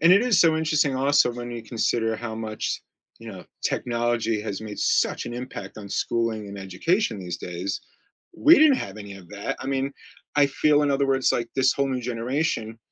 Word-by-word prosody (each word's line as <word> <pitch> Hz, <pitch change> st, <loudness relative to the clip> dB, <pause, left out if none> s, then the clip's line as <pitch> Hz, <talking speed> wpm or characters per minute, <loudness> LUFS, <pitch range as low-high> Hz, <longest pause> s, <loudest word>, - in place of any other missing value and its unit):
And 165 Hz, +3 st, +7 dB
it 200 Hz, +4 st, +6 dB
is 245 Hz, -6 st, +3 dB
so 160 Hz, -2 st, +5 dB
interesting 155 Hz, -3 st, +1 dB
also 135 Hz, -1 st, +3 dB
when 120 Hz, 0 st, -6 dB
you 120 Hz, -1 st, -6 dB
consider 115 Hz, 0 st, 0 dB
how 110 Hz, -1 st, -5 dB
much, 110 Hz, -1 st, -3 dB, 0.4 s
you -, -, -9 dB
know, -, -, -10 dB, 0.2 s
technology 115 Hz, -2 st, 0 dB
has 105 Hz, -2 st, -4 dB
made 110 Hz, -1 st, -7 dB
such -, -, +1 dB
an 120 Hz, -, -5 dB
impact 125 Hz, -3 st, -7 dB
on 100 Hz, -, -8 dB
schooling 110 Hz, 0 st, -1 dB
and 100 Hz, 0 st, -8 dB
education 105 Hz, -, 0 dB
these 90 Hz, -2 st, -5 dB
days. 90 Hz, +2 st, -4 dB, 0.6 s
We 310 Hz, +3 st, +7 dB
didn't 300 Hz, -3 st, +6 dB
have 100 Hz, +1 st, -6 dB
any 100 Hz, -2 st, -8 dB
of 95 Hz, -3 st, -13 dB
that. 100 Hz, 0 st, -4 dB
I -, -, -6 dB
mean, 135 Hz, 0 st, -1 dB, 0.4 s
I 145 Hz, -1 st, +5 dB
feel 150 Hz, +2 st, +3 dB
in 145 Hz, -, +2 dB
other 140 Hz, 0 st, +2 dB
words, 135 Hz, -1 st, +2 dB
like, 120 Hz, -1 st, -1 dB
this 130 Hz, -1 st, +3 dB
whole 140 Hz, 0 st, 0 dB
new 130 Hz, -1 st, -1 dB
generation, 120 Hz, -1 st, -2 dB
120 Hz, 200 wpm, -25 LUFS, 110-140 Hz, 0.6 s, And